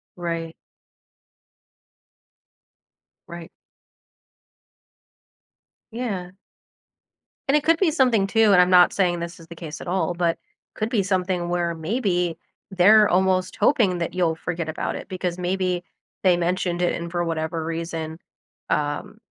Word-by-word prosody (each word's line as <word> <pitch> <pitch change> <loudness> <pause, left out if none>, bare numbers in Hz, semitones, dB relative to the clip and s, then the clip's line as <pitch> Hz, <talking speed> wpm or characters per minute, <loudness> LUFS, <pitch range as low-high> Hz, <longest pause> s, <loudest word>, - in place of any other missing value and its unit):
Right. 165 -2 -4 2.7
Right. 170 -1 -9 2.4
Yeah. 205 -7 -4 1.2
And 280 +2 +4
it 295 - -1
could 330 +1 +4
be 370 -5 +3
something 250 -9 +3
too, 225 0 +4
and 180 - +7
I'm 180 - +3
not 180 -1 +6
saying 175 -3 +1
this 170 +1 -6
is 165 - -14
the 170 - -10
case 160 -2 -8
at - - -9
all, 175 -1 0
but 170 -1 0 0.4
could 215 +1 -3
be 215 -5 +1
something 185 -2 -1
where 175 -1 -1
maybe 180 -1 -1 0.3
they're 205 +3 +6
almost 185 0 +1
hoping 215 -11 +3
that 170 -1 -3
you'll 175 -3 +1
forget 170 0 -4
about 155 - -3
it - - -8
because 180 -1 -3
maybe 180 0 -1 0.4
they 180 -2 +4
mentioned 175 0 -1
it 175 - +1
and 170 0 -6
for 175 0 -1
whatever 160 -1 -3
reason, 165 -1 -4 0.5
um, 145 +7 -2
180 Hz, 135 wpm, -23 LUFS, 170-190 Hz, 2.7 s, and